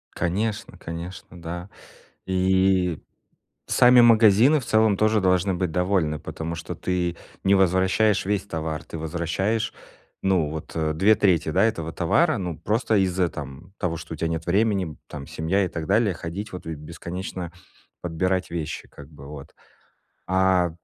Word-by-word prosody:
Конечно, 105 +5 -2
конечно, 85 +1 -8
да. 85 +3 -6 0.6
И 95 -2 +2 0.7
сами 125 0 +6
магазины 115 +5 +6
в 130 - -9
целом 110 -2 +3
тоже 110 +1 +3
должны 95 0 +2
быть 90 -1 -1
довольны, 90 -3 0
потому 80 +1 -5
что 80 - -6
ты 90 -2 -2 0.3
не 95 - +4
возвращаешь 95 +3 +3
весь 100 0 -1
товар, 80 -4 -4
ты - - -7
возвращаешь, 85 +8 -1 0.5
ну, 90 -6 +2
вот 80 0 -7 0.2
2/3 95 -4 +3
этого 85 -2 +1
товара, 125 - +2
ну, 90 -5 -4
просто 110 +6 0
из-за, 95 -1 +2
э, - - -2
там 75 +5 -9
того, 85 -2 -2
что 85 0 -8
у - - -4
тебя 80 +2 -1
нет 80 0 -3
времени 95 -4 +1
там, 70 -2 -8
семья 95 +5 0
и - - -1
так 80 -2 -5
далее, 110 +2 +2
ходить, 90 +5 -6
вот, 90 - -7
и 80 0 -4
бесконечно 85 +3 -6 0.5
подбирать 90 +2 -1
вещи 80 -2 -5
как 70 0 -13
бы, 70 -3 -13
вот. 75 0 -10 0.7
А. 95 -1 +3
90 Hz, 150 wpm, -24 LUFS, 80-100 Hz, 0.7 s, сами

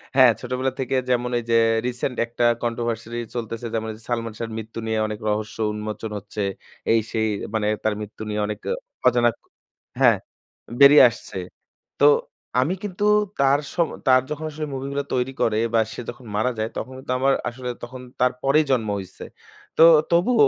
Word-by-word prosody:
হ্যাঁ 130 -3 +8
ছোটবেলা 130 +1 -1
থেকে 130 0 -1
যেমন 125 0 +1
এই - - -7
যে - - +4 0.3
রিসেন্ট 125 +1 -3
একটা 120 +1 -3 0.2
controversy 115 -1 -3 0.2
চলতেছে, 115 0 -4
যেমন 110 0 -2
ওই - - -8
যে 115 - -18
সালমান 115 -2 -2
শাহর 115 -1 -4
মৃত্যু 110 +1 -6
নিয়ে 110 0 -1
অনেক 105 -1 -5
রহস্য 110 +1 -2
উন্মোচন 105 +1 -5
হচ্ছে। 105 +1 -6 0.5
এই-সেই 110 0 +1 0.3
মানে 105 -1 0 0.2
তার 110 -1 +2
মৃত্যু 105 +1 -9
নিয়ে 105 - -2
অনেক 105 - -4
অ - - +2 0.3
অজানা 120 -1 +4
ক - - -53 0.6
হ্যাঁ - - +6 0.6
বেরিয়ে 140 0 +9
আসছে। 110 - -9 0.6
তো 145 - +5 0.6
আমি 155 +8 +1
কিন্তু 205 -1 -4 0.4
তার 140 +1 +4
সম 170 -2 +2 0.2
তার 130 0 +6
যখন 155 +1 -4
আসলে 155 0 -5
মুভিগুলা 140 +1 -3
তৈরি 125 +1 0
করে 110 -1 +2 0.2
বা 115 - +4
সে - - -6
যখন 130 - -9
মারা 125 +4 +1
যায় 110 - -1
তখন 130 - -5
কিন্তু 125 -1 -3
আমার, 135 +1 +3 0.2
আসলে 125 +1 -6
তখন 125 +1 -8 0.2
তার 125 0 +4
পরেই 150 +3 +4
জন্ম 115 -5 +1
হইছে। 95 -1 -10 0.5
তো - - +4 0.3
তবুও 210 +6 +5
120 Hz, 175 wpm, -23 LUFS, 110-135 Hz, 0.6 s, বেরিয়ে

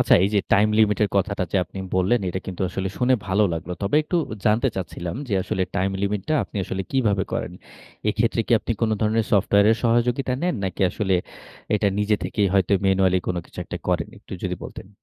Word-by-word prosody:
আচ্ছা, - - +5
এই - - +2
যে 100 - +4
টাইম 105 +2 +5
লিমিটের 105 -1 +3
কথাটা 100 -1 0
যে - - +2
আপনি 95 +3 -10 0.2
বললেন, 100 +6 +2
এটা 95 +2 -3
কিন্তু 95 -1 -6
আসলে 95 +1 -3
শুনে 130 +1 +3
ভালো 105 +3 +3
লাগলো। 85 +2 -4
তবে 100 +9 +1
একটু 175 +3 -1 0.3
জানতে 110 +5 +3
চাচ্ছিলাম 90 0 -4
যে 100 - 0
আসলে 95 - -1
টাইম 95 0 +1
লিমিটটা 105 +9 -1
আপনি - - -11
আসলে 95 +1 -3
কিভাবে 105 -8 +1
করেন? - - -2 0.6
এক্ষেত্রে 115 +2 +1
কি - - 0
আপনি 115 - -2
কোন 110 - +2
ধরনের 110 0 +1
সফটওয়্যারের 100 +2 +4
সহযোগিতা 120 +3 +2
নেন? 180 - +1
নাকি 95 0 -4
আসলে 95 -1 0 0.6
এটা 105 -1 +2
নিজে 105 0 +2
থেকেই 100 -2 +1
হয়তো 95 0 +2
ম্যানুয়ালি 95 -1 +3
কোন 90 - -1
কিছু - - -17
একটা - - -6
করেন? - - 0
একটু - - -14
যদি - - -2
বলতেন। 95 - -9
100 Hz, 195 wpm, -23 LUFS, 95-115 Hz, 0.6 s, আচ্ছা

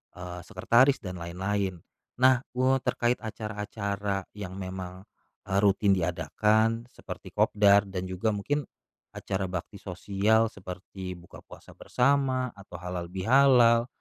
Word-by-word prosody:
eee, 90 0 -7
sekretaris 125 +9 +3
dan 90 -2 -6
lain-lain, 95 +1 -3 0.3
nah 130 0 +5 0.2
kuo 130 +1 +3
terkait 120 -1 0
acara-acara 105 -2 -4
yang 95 -3 -7
memang, 95 -1 -7 0.4
eee, 95 +1 0
rutin 100 0 +3
diadakan 105 +7 +1
seperti - - -10
kopdar 100 -1 +5
dan 95 -2 -5
juga 95 +4 -1
mungkin, 145 +9 -1 0.5
acara 95 0 -3
bakti 90 +3 -6
sosial 105 +4 +1
seperti 95 0 -8
buka 85 0 -14
puasa - - -14
bersama 130 -1 +1
atau 100 -3 -13
halal 90 0 -5
bihalal, 115 +4 +4
100 Hz, 120 wpm, -28 LUFS, 90-115 Hz, 0.5 s, nah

